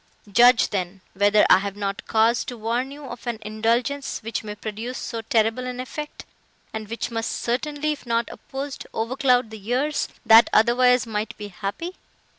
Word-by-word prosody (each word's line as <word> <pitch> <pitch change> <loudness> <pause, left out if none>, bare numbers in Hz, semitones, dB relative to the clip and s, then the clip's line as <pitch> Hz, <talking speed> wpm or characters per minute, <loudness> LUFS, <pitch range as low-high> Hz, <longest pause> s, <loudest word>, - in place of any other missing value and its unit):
Judge, 240 +2 +6
then, 190 -1 -3
whether 205 +2 +4
I - - +7
have 200 0 -4
not 200 -1 -4
cause 225 +2 +3
to 245 - -6
warn 235 +4 -1
you 285 +1 -10
of 245 -1 -9
an 235 -2 -1
indulgence, 230 +6 -1
which 225 +1 -3
may 210 -1 -6
produce 220 +4 -5
so 230 -2 -4
terrible 225 +2 +1
an 250 0 -5
effect, 295 +4 -6 0.5
and 220 -1 -5
which 230 +2 -4
must 225 0 -2
certainly, 290 +5 -1
if 290 -4 -7
not 230 0 +1
opposed, 270 +1 -7
overcloud 250 0 +1
the 220 - -8
years, 260 +8 -1 0.2
that 225 +1 +8
otherwise 250 +2 +4
might 215 -1 -4
be 210 -1 -7
happy. 200 - -5
230 Hz, 170 wpm, -24 LUFS, 215-255 Hz, 0.5 s, that